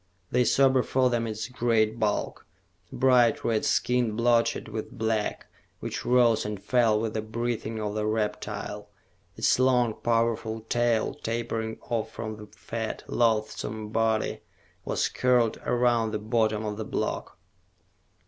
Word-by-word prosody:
They 125 0 +3
saw 135 +2 +5
before 130 -1 +2
them 115 -1 0
its 110 -1 -4
great 115 -2 +1
bulk, 105 -1 -1 0.4
bright 125 -3 +3
red 110 -2 +1
skin 125 -3 +1
blotched 115 0 +2
with 110 0 -5
black, 110 -1 -2 0.3
which - - -4
rose 120 -3 +4
and 105 -2 -4
fell 110 +1 +2
with 110 0 -2
the 110 - -1
breathing 115 0 -3
of 105 -1 -3
the 105 0 -1
reptile. 110 -1 -3 0.5
Its - - +2
long, 125 -3 +3
powerful 115 -1 0
tail, 120 0 +1
tapering 115 -1 -3
off 110 -2 -3
from 110 -1 -6
the 105 0 -10
fat, 110 +1 -5
loathsome 110 -1 0
body, 110 0 0 0.4
was - - 0
curled 125 -3 +2
around 120 -2 +2
the - - +1
bottom 110 0 0
of 105 -1 -3
the 110 - -3
block. - - -3
115 Hz, 140 wpm, -27 LUFS, 110-120 Hz, 0.5 s, saw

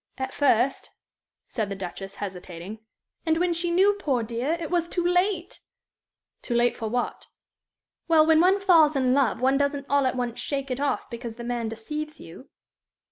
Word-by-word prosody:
"At 265 0 -4
first," 265 -2 +2 0.6
said 215 -4 -3
the 200 - -4
Duchess, 195 +1 -7
hesitating. 185 +1 -7 0.4
"And 320 -1 +1
when 350 0 +1
she 340 +1 -1
knew, 380 +4 +4
poor 265 -10 0
dear, 240 +7 -2
it 330 -1 -5
was 345 -1 +1
too 350 0 -2
late!" 360 0 0 0.8
"Too 240 - -3
late 240 0 +3
for 225 - -4
what?" 245 +2 -3 0.8
"Well, 320 -2 +5
when 320 0 +5
one 380 +3 +4
falls 330 -6 +5
in 255 -2 +2
love 255 -5 +1
one 265 +2 +3
doesn't 280 0 -1
all 280 -2 +3
at 255 - -1
once 245 -2 -3
shake 275 -2 -3
it 255 - -2
off 285 0 -1
because 235 -1 -6
the 240 - -8
man 235 -2 -2
deceives 300 +8 -6
you." 170 +11 -12
270 Hz, 180 wpm, -25 LUFS, 235-325 Hz, 0.8 s, Well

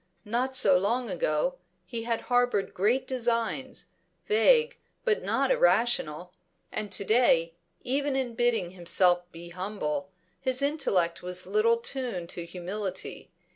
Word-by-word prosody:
Not 250 +5 -1
so 190 -7 +5
long 235 +5 -1
ago, - - 0 0.3
he 230 -2 -5
had 230 -1 -1
harboured 245 -5 +1
great 220 +8 +1
designs, 245 +1 -1 0.4
vague 465 +2 +3 0.3
but 445 -3 +2
not - - +1
irrational. 230 - +2 0.4
And 210 -2 -4
to 200 - -1
day, 175 -8 +3 0.3
even 275 +2 0
in 260 -3 -1
bidding 230 -6 +1
himself 175 0 +2
be 170 +1 -10
humble, 185 -1 -3 0.3
his 260 0 0
intellect 200 - 0
was 180 0 -4
little 215 +4 +3
tuned 235 -8 -3
to 170 -1 -6
humility. 185 +2 -5
230 Hz, 130 wpm, -28 LUFS, 180-260 Hz, 0.4 s, so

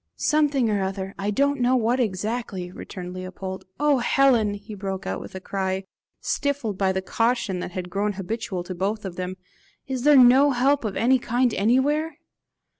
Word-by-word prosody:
"Something 290 -5 +2
or 205 -1 +1
other 190 0 -3
I 200 +1 -1
don't 280 +5 +1
know 250 +1 +3
what 245 +1 +1
exactly," 210 -3 -2
returned 180 -1 -8
Leopold. 185 +1 -6
"Oh 295 -2 +3
Helen!" 240 -4 +3
he 205 +2 -10
broke 195 -1 -5
out - - -3
with - - -10
a - - -4
cry, 190 0 -2 0.4
stifled 280 -8 -1
by 190 0 +1
the 190 0 -2
caution 225 -3 0
that 180 - -6
had 180 -2 -5
grown 205 +2 0
habitual 195 -1 -4
to 185 - -6
both 200 +4 -2
of 185 -2 -5
them, 185 0 -4 0.5
"is 260 -2 -3
there 295 +2 +6
no 260 +3 +7
help 270 +1 +2
of 205 - -3
any 255 +4 +3
kind 245 0 +1
anywhere? 285 - +1
210 Hz, 180 wpm, -24 LUFS, 190-255 Hz, 0.5 s, no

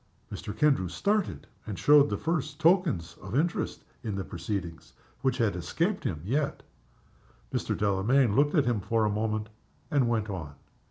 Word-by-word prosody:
Mr. 105 - -6
Kendrew 140 -11 +3
started, 205 - -1 0.2
and 105 - -4
showed 145 -1 +6
the - - -1
first 155 -3 -2
tokens 165 - +2
of 100 +4 -6
interest 165 +4 -1 0.2
in 110 -3 -3
the 95 - -2
proceedings 85 -1 -5 0.3
which 130 -1 +1
had 110 -7 +1
escaped 170 - -1
him 80 -4 -2
yet. 140 +7 -1 0.9
Mr. - - -1
Delamayn 105 +4 +2
looked 145 +4 +3
at 145 -4 +4
him 120 -3 +1
for 110 +3 +1
a 105 - +1
moment, 110 0 -1 0.4
and 135 -5 +3
went 110 -3 0
on. 80 -8 -6
115 Hz, 160 wpm, -28 LUFS, 100-150 Hz, 0.9 s, showed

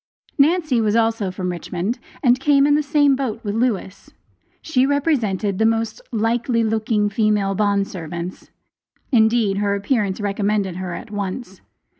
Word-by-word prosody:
Nancy 305 -4 +3
was 215 -1 +1
also 225 -3 +1
from 180 0 -3
Richmond, 180 +6 -4 0.2
and 250 -1 +4
came 280 0 +4
in 290 - +4
the 300 - +3
same 290 -1 +3
boat 250 -5 -3
with 205 -2 -2
Lewis. 210 -4 -2 0.5
She 260 -5 +1
represented 240 - 0
the 220 - +3
most 225 - -1
"likely 230 +1 0
looking 220 -1 0
female 205 -1 +1
bond 200 0 +1
servants." 170 +1 -7 0.6
Indeed 220 -4 +3
her 200 0 +1
appearance 205 -1 -1
recommended 200 -2 -1
her 185 -2 -4
at 230 - -9
once. 200 0 -5
215 Hz, 145 wpm, -21 LUFS, 200-245 Hz, 0.6 s, and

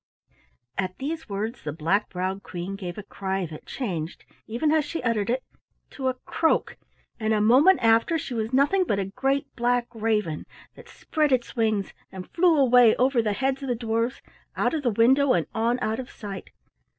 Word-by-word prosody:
At 185 -1 -2
these 310 +1 -5
words 215 +5 -3
the 150 - -3
black 170 +7 0
browed 190 +1 -3
Queen 180 +2 -6
gave 180 -2 -6
a 210 - -6
cry 195 -1 -3
that 155 -2 -10
changed, 175 - -4 0.2
even 240 +7 0
as 315 -1 +3
she 300 0 -5
uttered 230 -3 0
it, 255 +2 0 0.5
to 265 -2 -3
a 260 - 0
croak, 325 - +1 0.4
and 220 0 +1
a - - +2
moment 265 - +6
after 230 +8 +4
she 280 -4 -5
was 225 -1 -2
nothing 290 +9 +3
but 210 - 0
a 195 - -1
great 270 +8 -1
black 245 0 +1
raven 210 -8 -1 0.3
that 475 -1 -15
spread 305 -9 -1
its 250 -2 0
wings, 215 -4 0 0.2
and 185 -1 -9
flew 345 -2 +4
away 250 -4 +6
over 255 -1 +3
the 215 -2 0
heads 265 +5 -1
of 270 - -4
the 245 - +1
dwarfs, 230 +2 -2 0.3
out - - +1
of 315 - -1
the 255 - +1
window 255 +5 +4
and 170 - +1
on 230 +2 +1
out 220 +2 -1
of 255 - -6
sight. 200 -3 -8
230 Hz, 190 wpm, -25 LUFS, 200-270 Hz, 0.5 s, moment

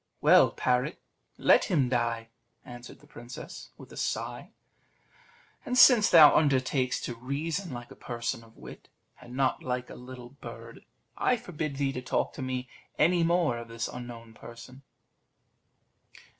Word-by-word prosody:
"Well, - - +6
parrot, 125 +5 -1 0.4
let - - +4
him 150 - +1
die," 120 -2 -1 0.4
answered 120 0 -11
the - - -18
princess, 120 +2 -10
with - - -14
a - - -11
sigh; - - -4 1.1
"and 250 - -2
since 245 -5 +7
thou 155 -4 +8
undertakest 130 -3 +1
to 120 - -4
reason 150 +9 -4
like 120 -1 -8
a - - -11
person 120 -1 -4
of 115 0 -20
wit, - - -12 0.3
and 125 0 -11
not 130 -1 0
like 125 -1 -4
a - - -9
little 125 -1 -10
bird, 140 +2 -11 0.4
I 250 - +2
forbid 160 - -5
thee 135 0 0
to 125 - -5
talk 125 - -1
to - - -8
me 130 -1 -3 0.3
any 175 +2 +3
more 165 -7 +1
of 115 - -9
this 115 0 -4
unknown 120 -2 -9
person." 120 +4 -12
130 Hz, 150 wpm, -28 LUFS, 120-150 Hz, 1.1 s, thou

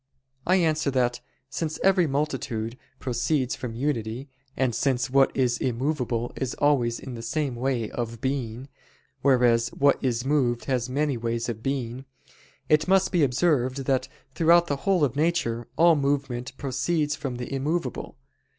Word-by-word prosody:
I 185 - +5
answer 155 -5 +2
that, 125 -2 0 0.3
Since 155 +3 -3
every 190 -3 +4
multitude 130 -5 -2 0.2
proceeds 130 +1 -1
from 120 -3 -6
unity; 125 -1 -2 0.3
and 130 -3 +1
since 130 +1 0
what 135 0 +5
is 125 -2 +1
immovable 125 -2 -1
is 130 -2 -3
always 125 -5 +2
in 130 - -8
the 115 - -6
same 130 +2 -2
way 120 -2 -1
of 115 -1 -4
being, 130 -1 -3 0.5
whereas 120 -3 +4
what 140 +3 +2
is 120 -1 0
moved 130 -5 +1
has 130 -2 -1
many 140 0 0
ways 115 +1 -2
of 110 -2 -5
being: 130 -1 -3 0.6
it 155 +1 +3
must 190 0 +3
be 175 - +2
observed 135 -1 +1
that 130 -1 +1 0.3
throughout 170 +1 +5
the 145 -4 -2
whole 185 -5 +3
of 135 -2 +1
nature, 150 -7 0
all 170 0 +6
movement 140 -2 -2
proceeds 145 +3 -1
from 140 -3 -4
the 125 +2 -6
immovable. 140 0 -2
130 Hz, 150 wpm, -26 LUFS, 120-150 Hz, 0.6 s, all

